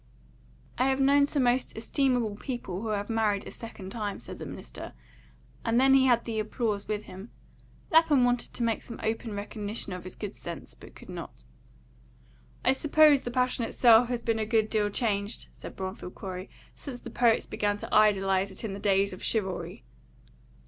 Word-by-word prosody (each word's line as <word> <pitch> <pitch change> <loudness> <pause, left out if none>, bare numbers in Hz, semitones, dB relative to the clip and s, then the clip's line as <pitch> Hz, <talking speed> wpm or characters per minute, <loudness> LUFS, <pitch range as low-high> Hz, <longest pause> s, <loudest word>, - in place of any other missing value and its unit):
"I 255 +2 +3
have 265 0 +1
known 280 +1 +5
some 285 -2 0
most 245 0 +1
estimable 245 -2 +1
people 210 -6 -5
who 225 - -4
had 205 -1 -1
married 215 -3 0
a - - -8
second 200 -4 -9
time," 210 -2 -3
said 115 - -9
the - - -6
minister, - - -8 0.7
and 230 +1 +2
then 270 +1 +6
he 265 -1 +6
had 240 -2 +3
the 225 -2 -2
applause 215 -1 -2
with 210 0 -2
him. 190 +5 -10 0.6
Lapham 320 -5 +5
wanted 245 0 0
to 240 - -2
make 230 -1 0
some 230 - -9
open 220 -1 -2
recognition 205 0 -5
of 180 - -6
his 185 - -8
good 205 -1 -5
sense, 170 -1 -8
but - - -15
could - - -14
not. - - -8 1.2
"I 260 - +5
suppose 300 0 +5
the - - -4
passion 250 0 0
itself 235 0 +5
has 240 -2 -2
been 225 -1 0
a - - +1
good 220 -1 +2
deal 210 -2 +2
changed," 205 -1 -2
said - - -10
Bromfield 185 -1 -6
Corey, 185 0 -6 0.3
"since 255 -4 -8
the - - -8
poets 235 -2 +3
began 205 0 -1
to - - -8
idealise 195 -2 +4
it 190 - -9
in 215 -3 -3
the 195 - -6
days 195 -1 +2
of 185 - -9
chivalry." 180 - -2
220 Hz, 185 wpm, -28 LUFS, 200-245 Hz, 1.2 s, then